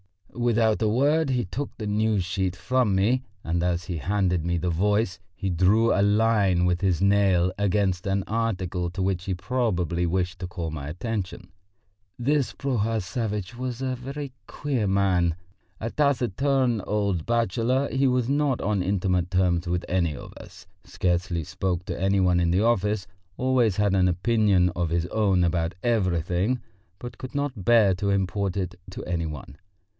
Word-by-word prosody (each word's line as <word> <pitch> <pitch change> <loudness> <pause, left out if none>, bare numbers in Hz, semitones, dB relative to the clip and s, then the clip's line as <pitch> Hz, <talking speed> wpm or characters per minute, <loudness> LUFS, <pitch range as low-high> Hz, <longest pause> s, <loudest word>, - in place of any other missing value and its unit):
Without 115 -2 +1
a 110 - +2
word 145 +7 +2
he 125 -4 0
took 130 +10 -5
the 110 - -5
News 105 -1 +1
sheet 95 0 -2
from 125 -1 +1
me, 115 +7 +2 0.2
and 85 +1 -1
as 90 0 0
he 90 -1 -4
handed 90 0 0
me 85 0 0
the 90 +1 -1
Voice 105 +2 +1 0.2
he 95 0 -3
drew 100 +7 +3
a 100 - +2
line 105 -3 +3
with 90 0 +1
his 95 -3 +1
nail 95 -3 +3
against 100 -2 +1
an 95 0 0
article 95 -6 -2
to 95 - -4
which 95 -1 -1
he 95 - -1
probably 90 -5 -1
wished 90 +1 -1
to 90 - -4
call 85 -2 -5
my 70 -3 -6
attention. 90 +3 -5 0.7
This 140 +2 0
Prohor 115 -5 -1
Savvitch 105 +1 -3
was 125 -1 -4
a 130 -1 -1
very 135 +2 -6 0.2
queer 130 -8 -2
man: 95 -4 +2 0.4
a 115 +1 -3
taciturn 130 -3 +1
old 100 -6 0
bachelor, 120 +3 +1
he 135 +1 +2
was 125 -2 +1
not 140 -2 +1
on 100 -2 0
intimate 90 -2 0
terms 90 -2 +1
with 90 0 -1
any 85 -5 +1
of - - -10
us, - - -13 0.2
scarcely 90 -1 -1
spoke 90 +3 -2
to - - -5
any 95 0 +2
one 90 -1 +3
in 85 -1 +2
the 95 +4 +2
office, 105 -3 +1 0.3
always 125 -5 +2
had 105 -1 +2
an 95 -1 +3
opinion 95 0 +2
of 85 -1 -2
his 85 +1 0
own 95 -3 +2
about 85 0 0
everything, 95 0 +1 0.4
but 120 +3 -9
could 130 +1 -8
not 135 -9 -3
bear 110 -5 +5
to 100 +2 -2
import 100 0 0
it 90 -2 -2 0.2
to 95 - -7
any 85 -2 -2
one. 70 -1 -8
100 Hz, 170 wpm, -25 LUFS, 90-115 Hz, 0.7 s, bear